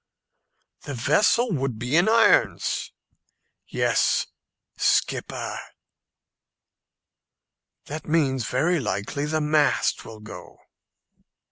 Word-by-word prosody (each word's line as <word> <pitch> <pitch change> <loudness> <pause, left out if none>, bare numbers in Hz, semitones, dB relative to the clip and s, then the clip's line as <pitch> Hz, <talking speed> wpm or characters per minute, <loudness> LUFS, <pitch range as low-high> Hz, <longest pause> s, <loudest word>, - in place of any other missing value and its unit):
"The 140 - -7
vessel 205 - +2
would 135 - -2
be 125 +5 -2
in 175 +5 +4
irons." 230 +1 +2 0.8
"Yes, - - +1 0.5
skipper." - - -1 2.3
"That 155 +2 -7
means 135 -7 +1
very 160 +7 +1
likely 105 +5 -3
the 155 +1 -1
mast 150 0 +1
will 110 -1 -11
go." 105 0 -11
145 Hz, 85 wpm, -24 LUFS, 125-160 Hz, 2.3 s, in